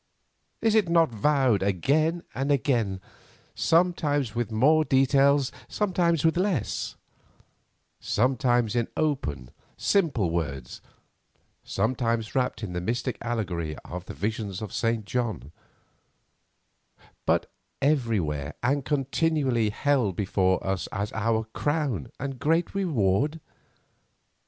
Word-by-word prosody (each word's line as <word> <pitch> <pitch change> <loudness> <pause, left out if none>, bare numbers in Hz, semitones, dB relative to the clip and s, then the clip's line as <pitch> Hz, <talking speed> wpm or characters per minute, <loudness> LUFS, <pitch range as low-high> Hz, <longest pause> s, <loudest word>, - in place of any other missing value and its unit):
Is 225 -1 +3
it 215 -6 +3
not 165 -4 +4
vowed 130 -2 +2
again 145 - +1
and 135 +5 -1
again, 120 -8 +1 0.5
sometimes 155 - +1
with 120 -1 -2
more 150 +8 +4
detail, 140 0 +4 0.3
sometimes 175 -6 +1
with 160 +1 +3
less; 185 - -1 1.0
sometimes 120 -1 +1
in 120 -1 +1
open, 75 - -1 0.3
simple 140 - +1
words, 70 -7 -4 0.8
sometimes 115 +1 -1
wrapped 125 -3 -1
in 95 -4 -4
the 90 - -2
mystic 120 +6 -2
allegory 90 -10 -3
of 90 +1 -7
the - - -8
visions 105 -3 -3
of 105 -4 -6
St. 115 -2 0
John; 110 - -3 1.8
but - - +1 0.3
everywhere 105 - 0
and 140 +3 +1
continually 135 -4 +1
held 120 -4 +1
before 95 -2 +1
us 95 -1 -1
as 100 +2 -3
our 110 0 +1
crown 145 - -1
and 135 -1 -4
great 165 +5 +1
reward? 150 - +1
120 Hz, 110 wpm, -26 LUFS, 100-145 Hz, 1.8 s, not